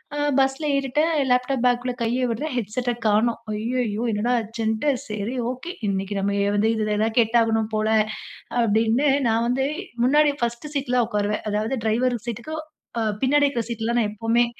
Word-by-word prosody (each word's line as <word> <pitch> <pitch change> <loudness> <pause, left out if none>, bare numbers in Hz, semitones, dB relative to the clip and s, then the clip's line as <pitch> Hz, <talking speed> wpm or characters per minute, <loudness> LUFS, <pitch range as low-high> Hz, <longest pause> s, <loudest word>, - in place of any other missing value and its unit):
ஆ, - - -3 0.2
பஸ்ல 270 +3 +1
ஏறிட்டேன். 275 +4 +1 0.2
லேப்டாப் 250 0 +1
பாக்க்குள்ள 245 0 +1
கையை 240 +3 0
விடுறேன். 235 +8 -2
ஹெட்செட்ட 245 +3 -1
காணோம். 220 +2 +2
ஐய்யயோ! 225 0 -1
என்னடா 215 +3 0
ஆச்சுண்ட்டு 220 +4 -1 0.2
சரி, 210 +2 -4 0.2
ஓகே, 265 +8 -7 0.2
இன்னிக்கு 195 +1 -2
நம்ம 200 +1 0
எ - - +1
வந்து 210 +2 +2
இதில 215 -1 0
தான் 225 0 -1
கேட்டாவணும் 225 -1 +2
போல 215 0 +1 0.7
அப்டின்னு 225 +5 +2 0.2
நான் 230 +1 +2
வந்து 260 +2 +1 0.4
முன்னாடி 295 +3 +4
ஃபர்ஸ்ட்டு 235 +5 -3
சீட்ல 250 -3 +1
உக்காருவேன். 210 -1 -1
அதாவது, 215 +4 -1
டிரைவர் 245 +3 +2
சீட்டுக்கு 240 +7 -5 0.4
அ - - 0 0.2
பின்னாடி 290 +2 +4
இருக்கிற 245 -4 -2
சீட்ல 235 0 -2
நான் 215 - +1
எப்போமே, 225 +3 +2
235 Hz, 155 wpm, -23 LUFS, 215-255 Hz, 0.7 s, முன்னாடி